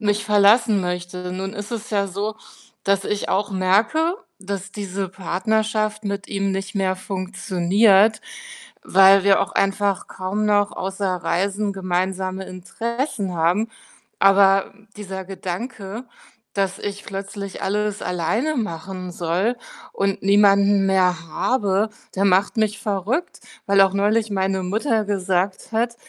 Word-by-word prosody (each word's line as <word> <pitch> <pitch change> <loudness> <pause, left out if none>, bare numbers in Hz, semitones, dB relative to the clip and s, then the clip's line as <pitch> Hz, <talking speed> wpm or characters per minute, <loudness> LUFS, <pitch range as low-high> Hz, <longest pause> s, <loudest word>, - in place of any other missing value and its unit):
mich 205 -1 0
verlassen 210 +1 +4
möchte. 180 0 -4
Nun 190 +1 -4
ist 205 -2 -7
es 225 -2 -5
ja 200 -2 0
so, 205 +3 -3 0.5
dass 195 0 +1
ich 210 -1 -2
auch 200 +2 0
merke, 220 - +2 0.2
dass 195 0 -5
diese 195 -2 -4
Partnerschaft 215 +3 -1
mit 200 -1 -4
ihm 195 -1 -1
nicht 195 0 -4
mehr 190 -1 0
funktioniert, 195 +3 +2 0.6
weil 195 0 +6
wir 195 0 +4
auch - - -2
einfach 195 0 0
kaum 190 +3 -3
noch 205 -1 +2
außer 190 -2 -2
Reisen 200 +5 0
gemeinsame 190 0 -2
Interessen 225 - -4
haben. 175 +7 +1 0.5
Aber 195 0 +4 0.2
dieser 190 -2 -6
Gedanke, 195 +4 -6 0.5
dass 195 -1 -1
ich 205 0 -5
plötzlich 195 0 -6
alles 210 +1 -1
alleine 210 - -1
machen 185 -3 -4
soll 180 +8 0 0.4
und 195 0 -1
niemanden 200 0 +4
mehr 180 -3 +1
habe, 205 +2 0 0.3
der 195 - +2
macht 195 +2 +3
mich 215 -1 0
verrückt, 210 - -2 0.3
weil 200 0 +4
auch 195 -1 +5
neulich 210 +2 +1
meine 190 -1 0
Mutter 220 +4 0
gesagt 190 -1 -1
hat, 235 +1 0
195 Hz, 130 wpm, -22 LUFS, 190-210 Hz, 0.6 s, weil